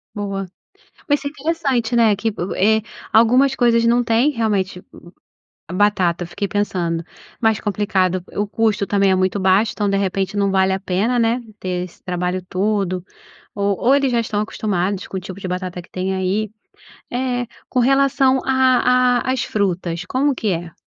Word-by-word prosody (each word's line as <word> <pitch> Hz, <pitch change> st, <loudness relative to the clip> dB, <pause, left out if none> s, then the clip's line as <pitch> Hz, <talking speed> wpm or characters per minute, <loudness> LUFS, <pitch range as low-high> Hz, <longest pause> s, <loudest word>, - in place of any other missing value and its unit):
Boa. 195 Hz, -2 st, -3 dB, 0.6 s
Mas 290 Hz, -1 st, +1 dB
é 285 Hz, -, -2 dB
interessante, 275 Hz, -6 st, -1 dB
né, 230 Hz, -3 st, +5 dB
que, 205 Hz, +3 st, -3 dB, 0.3 s
eh, 220 Hz, +3 st, +3 dB, 0.3 s
algumas 250 Hz, +5 st, +5 dB
coisas 235 Hz, -2 st, +3 dB
não 240 Hz, +1 st, +3 dB
têm, 235 Hz, +5 st, +2 dB
realmente 205 Hz, -7 st, -1 dB, 0.9 s
a -, -, -8 dB
batata, 185 Hz, -3 st, +2 dB
eu -, -, -7 dB
fiquei 195 Hz, +3 st, -3 dB
pensando. 175 Hz, -5 st, -1 dB, 0.4 s
Mais 220 Hz, -3 st, +2 dB
complicado, 190 Hz, -3 st, 0 dB
o 205 Hz, -, 0 dB
custo 215 Hz, -1 st, +1 dB
também 200 Hz, -1 st, +2 dB
é -, -, +4 dB
muito 185 Hz, +1 st, +1 dB
baixo, 190 Hz, +3 st, +3 dB
então 205 Hz, -1 st, -1 dB
de 195 Hz, -, +1 dB
repente 195 Hz, +1 st, -1 dB
não 200 Hz, -1 st, +2 dB
vale 190 Hz, 0 st, +2 dB
a 190 Hz, -, -1 dB
pena, 200 Hz, +6 st, 0 dB
né. 230 Hz, +2 st, +1 dB, 0.2 s
Ter 180 Hz, -1 st, -2 dB
esse 180 Hz, -, -14 dB
trabalho 180 Hz, 0 st, -2 dB
todo. 190 Hz, -2 st, -1 dB, 0.5 s
Ou 200 Hz, -1 st, 0 dB
ou 260 Hz, +3 st, +4 dB
eles 275 Hz, -2 st, +2 dB
já 235 Hz, -1 st, +2 dB
tão 210 Hz, -2 st, -2 dB
acostumados 200 Hz, -3 st, -2 dB
com 190 Hz, -, -5 dB
o -, -, -2 dB
tipo 185 Hz, +1 st, -9 dB
de 190 Hz, -, -5 dB
batata 180 Hz, 0 st, -4 dB
que 175 Hz, -, -20 dB
tem 185 Hz, +1 st, -2 dB
aí. 190 Hz, +3 st, -1 dB, 0.6 s
Eh, 245 Hz, -1 st, -1 dB, 0.2 s
com -, -, -2 dB
relação 270 Hz, 0 st, +3 dB
à 255 Hz, -1 st, +3 dB
à 260 Hz, -, +2 dB
às 260 Hz, -, -1 dB
frutas, 180 Hz, -4 st, -2 dB
como 270 Hz, +8 st, +1 dB
que 225 Hz, -, -2 dB
é? 170 Hz, -2 st, -4 dB
205 Hz, 175 wpm, -20 LUFS, 185-245 Hz, 0.9 s, né